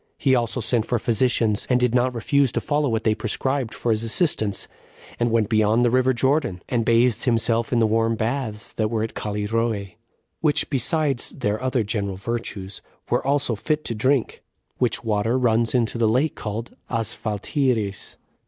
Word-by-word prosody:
He 135 -3 +2
also 120 0 +1
sent 115 0 +1
for 120 - +1
physicians, 115 -2 +1
and 125 -1 +3
did 125 -2 +1
not 125 0 +2
refuse 140 +2 +2
to - - +1
follow 145 -1 0
what 110 -1 -1
they 110 - +3
prescribed 115 +2 -2
for 120 - -1
his 110 0 +1
assistance, 110 - 0 0.5
and 120 0 +2
went 115 -2 +2
beyond 110 +2 +3
the 120 - +2
river 130 +1 +3
Jordan, 130 - 0
and 120 -2 0
bathed 115 0 +2
himself 115 -1 +1
in 120 - +2
the 115 - +4
warm 115 +1 +1
baths 110 -1 -3
that 110 -1 -1
were 110 -1 -1
at 115 - -4
Callirrhoe, 105 -1 -2 0.5
which, 150 -1 +1
besides 140 0 0
their 110 -4 -2
other 130 -2 0
general 100 -2 -3
virtues, 100 -3 -5 0.3
were - - +2
also 140 -2 +1
fit 150 +8 -2
to - - -1
drink; 130 +3 0 0.4
which 125 -2 0
water 115 +2 +1
runs 115 -1 +2
into 115 -1 +1
the 115 -2 +3
lake 130 +8 +2
called 110 +2 -5
Asphaltiris. 115 0 -1
115 Hz, 170 wpm, -23 LUFS, 110-130 Hz, 0.5 s, the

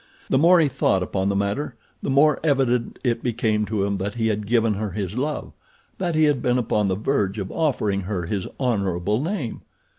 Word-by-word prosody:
The 130 - +4
more 175 +4 +6
he 160 - +4
thought 120 -8 +1
upon 95 +1 -1
the 100 - 0
matter 100 +7 -1 0.3
the - - -3
more 140 +2 +4
evident 130 -5 +1
it 120 -3 0
became 110 -3 0
to 105 -3 -1
him 100 -1 -1
that 100 +3 -3
he 110 -1 +1
had 105 -1 -2
given 115 -1 +2
her 105 +1 -3
his 95 0 -4
love—that 170 - -5
he 155 - +4
had 145 -4 +3
been 125 0 +2
upon 105 -4 +1
the 95 - +1
verge 105 -2 0
of 95 -2 -4
offering 110 -11 0
her 90 -2 -3
his 95 +1 -3
honorable 100 -4 0
name. 155 - -3
110 Hz, 200 wpm, -23 LUFS, 100-135 Hz, 0.3 s, more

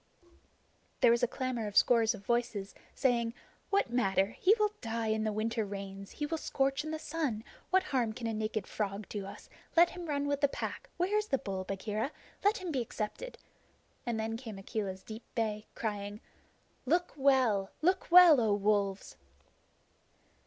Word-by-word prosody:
There 245 -3 +7
was 235 +1 +3
a 245 - +3
clamor 255 -3 -3
of 205 - -3
scores 230 -2 +5
of 200 -1 -13
voices, 230 -4 -1 0.2
saying: 235 -3 +1 0.3
"What 400 -11 +2
matter? 195 -3 +2
He 400 +4 +6
will 425 -1 +2
die 230 -1 -2
in 220 0 +1
the 215 - +1
winter 220 +1 -1
rains. 195 -1 -7
He 295 - -4
will 325 +2 -2
scorch 270 0 0
in 310 - -5
the 315 - -2
sun. 300 -9 -2 0.3
What 375 +1 +4
harm 255 -10 0
can 230 +2 -7
a 225 - -1
naked 215 -1 -2
frog 200 -1 -3
do 200 -2 -4
us? - - -10 0.3
Let 345 +1 +7
him 355 -2 -7
run 285 -1 -1
with 285 -1 0
the 285 - +5
Pack. - - -5
Where 370 +4 +1
is 425 - -4
the 270 - +2
bull, 190 -5 -4
Bagheera? 210 +6 -2 0.3
Let 410 +2 +4
him 370 -3 -4
be 265 -4 0
accepted." 235 - -5 0.7
And 235 -2 -2
then 225 +1 -2
came 225 -4 -8
Akela's 195 -1 -4
deep 220 +1 -8
bay, 215 -2 -1
crying: 205 -1 -3 0.7
"Look 350 +1 +2
well 260 -9 +3
look 370 +3 +2
well, 345 -6 +9
O 215 -3 +3
Wolves!" 200 - 0
230 Hz, 175 wpm, -32 LUFS, 210-285 Hz, 0.7 s, well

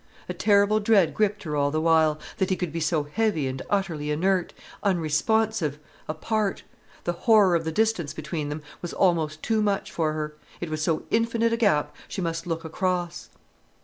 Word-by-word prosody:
A - - -3
terrible 205 0 +3
dread 205 -5 +3
gripped 210 -1 0
her 150 -3 -3
all 145 -1 +2
the 155 +2 -1
while: 160 -1 +3 0.2
that 190 - 0
he 190 - +2
could 180 -3 -3
be 165 - -3
so 155 -1 +1
heavy 160 0 0
and 130 0 -3
utterly 170 -7 -1
inert, 180 +4 +1 0.3
unresponsive, 185 0 +1 0.3
apart. 200 +6 -1 0.4
The 175 - -1 0.2
horror 210 -5 +7
of 165 -1 0
the 160 - -1
distance 215 -5 +1
between 155 -1 -4
them 150 +1 -5 0.2
was 175 - -5
almost 160 -4 +1
too 220 -1 +1
much 205 -2 0
for 155 -2 0
her—it 155 +2 -6
was 155 0 -2
so 155 0 0
infinite 230 0 +2
a - - +1
gap 200 -11 +2
she - - -6
must 165 -1 -3
look 165 0 -3
across. 175 +1 -2
170 Hz, 180 wpm, -25 LUFS, 155-205 Hz, 0.4 s, horror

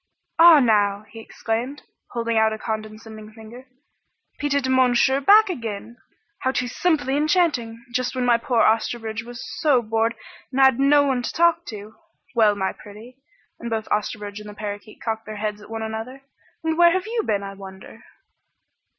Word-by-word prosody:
"Ah, 335 -2 +9
now!" 205 -4 +2
he 225 - -10
exclaimed, 235 +5 -4 0.3
holding 230 -1 -2
out 220 0 +3
a 220 - -4
condescending 215 0 -7
finger, 225 +4 -13 0.7
"Petit 280 -2 0
Monsieur 260 +1 +3
back 420 +9 +6
again! 230 - -6 0.4
How 260 - 0
too 250 -1 -2
simply 285 -1 0
enchanting! 290 -7 0
Just 255 +1 -1
when 255 -1 -1
poor 230 -2 +1
Osterbridge 225 0 0
was 240 +2 -9
so 295 -5 +3
bored 225 +1 0 0.4
and 265 - -2
had 265 -2 +5
no 285 +1 +5
one 265 -3 0
to - - -4
talk 340 0 +2
to! 215 -1 -9 0.4
Well, 215 -3 +4
my 190 -1 -2
pretty 220 +5 -14 0.2
" - - -41
and 235 - -6
both 220 -1 -3
Osterbridge 210 -1 -3
and 210 0 -10
the 205 - -11
parakeet 205 0 -7
cocked 220 -1 -4
their 215 - -6
heads 210 0 -4
at 210 - -14
one 225 0 -5
another 225 +5 -6 0.4
"and 320 +1 -1
where 345 -1 +6
have 375 0 -1
you 455 +1 -1
been, 205 - -1
I 195 0 -7
wonder?" 190 -1 -12
230 Hz, 170 wpm, -22 LUFS, 215-270 Hz, 0.7 s, Ah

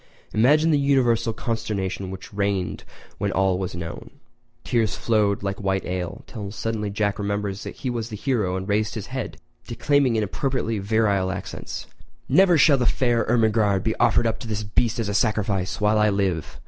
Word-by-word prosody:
Imagine 150 +9 +4
the 145 - +3
universal 120 -5 +2
consternation 100 -5 -3
which 95 +2 -9
reigned 100 -2 -1 0.3
when 100 -1 0
all 95 -1 +1
was 95 -2 -4
known! 85 -1 -7 0.5
Tears 115 -4 +1
flowed 105 -3 +1
like 100 +1 -3
white 95 -1 0
ale, 90 -2 -4
till 105 -3 -7
suddenly 110 0 -3
Jack 100 0 -1
remembered 100 -1 -2
he 130 - -7
was 115 -1 -3
the 110 - -5
hero 105 -5 0
and 95 +1 -5
raised 105 +1 0
his 110 - -4
head, 130 -3 -4 0.3
declaiming 135 +1 +2
in 110 - +1
appropriately 115 0 -1
virile 100 -2 +1
accents: 95 -1 -6 0.4
"Never 185 -3 +5
shall 140 -2 +5
the 125 - +2
fair 120 +2 +2
Ermengarde 110 -4 +2
be 110 - 0
offered - - +3
up 110 -1 0
to 120 - -7
this 110 -1 -2
beast 110 +3 0
as 115 -3 -1
a 100 - -2
sacrifice 100 -3 0
while 105 0 +3
I 105 0 +4
live! 95 -5 -1
105 Hz, 175 wpm, -24 LUFS, 100-115 Hz, 0.5 s, Never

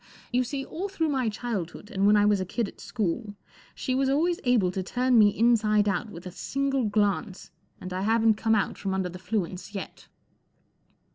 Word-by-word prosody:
You 250 +1 +3
see. 270 +2 -4
all 375 +8 -5
through 325 -5 -1
my 260 -5 +1
childhood 210 -2 -5
and 195 -2 +2
when 210 - +6
I 205 - +4
was 205 -2 +3
a - - 0
kid 225 +4 -2
at - - -13
school 210 0 -3 0.4
she 255 - -2
was 265 +1 +1
always 335 +6 +1
able 230 -8 +3
to 190 - -3
turn 245 +5 +2
me 210 -1 +7
inside 215 -2 +3
out 200 +2 -1
with 175 -2 -10
a 180 - -6
single 275 +5 -1
glance, 205 -3 -1 0.3
and 185 - -7
1 185 +1 -2
haven't 225 0 +4
come 225 +1 +1
out 205 - -1
from 195 -1 -2
under 190 -1 -1
the 180 +1 -9
'fluence 185 0 -3
yet. 195 - -7
215 Hz, 200 wpm, -27 LUFS, 195-250 Hz, 0.4 s, me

